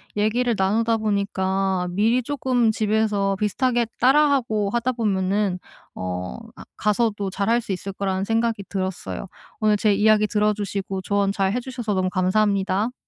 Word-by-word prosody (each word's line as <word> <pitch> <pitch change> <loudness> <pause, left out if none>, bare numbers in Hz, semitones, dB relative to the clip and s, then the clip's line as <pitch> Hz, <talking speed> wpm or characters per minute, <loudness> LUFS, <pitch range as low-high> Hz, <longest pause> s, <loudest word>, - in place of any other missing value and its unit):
얘기를 230 +4 +1
나누다 225 +4 +1
보니까 195 -3 0
미리 220 +7 +2
쪼끔 255 -3 0
집에서 210 -2 +1
비슷하게 240 +3 0
따라하고 255 -6 +3
하다 240 +2 0
보면은 195 -3 0 0.4
어 90 -6 -4 0.2
아 - - -11
가서도 210 -1 0
잘할 225 +5 +1
수 220 - -6
있을 195 +1 -4
거라는 190 -1 -2
생각이 225 -1 0
들었어요. 185 - -4 0.3
오늘 215 -1 +3
제 205 0 +2
이야기 215 +1 +4
들어주시고 205 -2 -1
조언 200 +1 0
잘해 200 +4 0
주셔서 240 -4 -4
너무 185 0 +1
감사합니다. 200 +3 +1
210 Hz, 340 characters per minute, -23 LUFS, 195-230 Hz, 0.4 s, 이야기